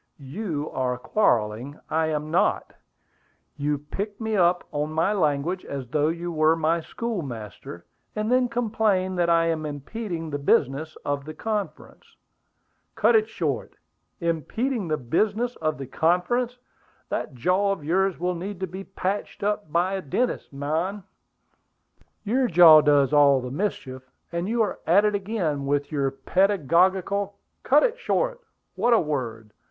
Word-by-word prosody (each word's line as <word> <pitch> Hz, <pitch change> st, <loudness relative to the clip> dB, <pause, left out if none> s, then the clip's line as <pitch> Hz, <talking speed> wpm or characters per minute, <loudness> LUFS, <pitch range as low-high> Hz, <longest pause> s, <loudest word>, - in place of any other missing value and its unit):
"You 150 Hz, +1 st, -4 dB
are 125 Hz, -1 st, -1 dB
quarrelling; 120 Hz, -, 0 dB
I 160 Hz, 0 st, +1 dB
am 155 Hz, 0 st, -3 dB
not. 170 Hz, -, +1 dB, 0.8 s
You 145 Hz, +1 st, -1 dB
pick 195 Hz, +9 st, -6 dB
me 220 Hz, -1 st, -2 dB
up 175 Hz, -2 st, +3 dB
on 150 Hz, +1 st, -2 dB
my 165 Hz, +6 st, +2 dB
language 165 Hz, 0 st, 0 dB
as 135 Hz, -3 st, -6 dB
though 150 Hz, +3 st, +1 dB
you 170 Hz, +2 st, -3 dB
were 155 Hz, 0 st, +3 dB
my 165 Hz, +1 st, +1 dB
schoolmaster, 125 Hz, -, -6 dB, 0.3 s
and 215 Hz, +2 st, -1 dB
then 250 Hz, -1 st, +3 dB
complain 215 Hz, -5 st, 0 dB
that 175 Hz, -1 st, +2 dB
I 165 Hz, 0 st, +4 dB
am 165 Hz, -2 st, -1 dB
impeding 165 Hz, -, -5 dB
the 145 Hz, -, -2 dB
business 140 Hz, +2 st, +1 dB
of 145 Hz, -1 st, -1 dB
the 155 Hz, 0 st, -8 dB
conference." 215 Hz, -2 st, -5 dB, 0.8 s
"Cut -, -, +4 dB
it 435 Hz, 0 st, +3 dB
short! -, -, -3 dB, 0.5 s
'Impeding 185 Hz, -, -1 dB
the 155 Hz, -1 st, 0 dB
business 215 Hz, -, 0 dB
of 155 Hz, -2 st, -1 dB
the 135 Hz, -, -6 dB
conference!' 180 Hz, -, 0 dB, 0.5 s
That 140 Hz, -, -3 dB
jaw 185 Hz, +10 st, +1 dB
of 195 Hz, -6 st, -4 dB
yours 190 Hz, +2 st, +1 dB
will 180 Hz, +1 st, 0 dB
need 185 Hz, +2 st, -6 dB
to -, -, +1 dB
be 190 Hz, +2 st, -8 dB
patched 195 Hz, +1 st, -4 dB
up 205 Hz, -5 st, -1 dB
by 175 Hz, +4 st, +1 dB
a 195 Hz, -, -2 dB
dentist, 235 Hz, -, -2 dB
man!" 160 Hz, +8 st, -2 dB, 1.2 s
"Your 250 Hz, +5 st, +1 dB
jaw 165 Hz, -5 st, +8 dB
does 145 Hz, -1 st, +3 dB
all 140 Hz, -2 st, +6 dB
the 125 Hz, 0 st, -6 dB
mischief; 130 Hz, -7 st, -4 dB, 0.2 s
and 170 Hz, +3 st, -2 dB
you 230 Hz, 0 st, +2 dB
are 210 Hz, -, -3 dB
at 195 Hz, +6 st, +5 dB
it 210 Hz, -, +2 dB
again, 190 Hz, -9 st, -2 dB
with 145 Hz, +1 st, 0 dB
your 140 Hz, -3 st, 0 dB
pedagogical 190 Hz, +6 st, +1 dB
" -, -, -49 dB
"Cut 295 Hz, +3 st, +4 dB
it -, -, 0 dB
short! -, -, -1 dB, 0.3 s
What 240 Hz, -, +2 dB
a 230 Hz, -, +6 dB
word! 115 Hz, -9 st, -4 dB
170 Hz, 155 wpm, -25 LUFS, 145-205 Hz, 1.2 s, jaw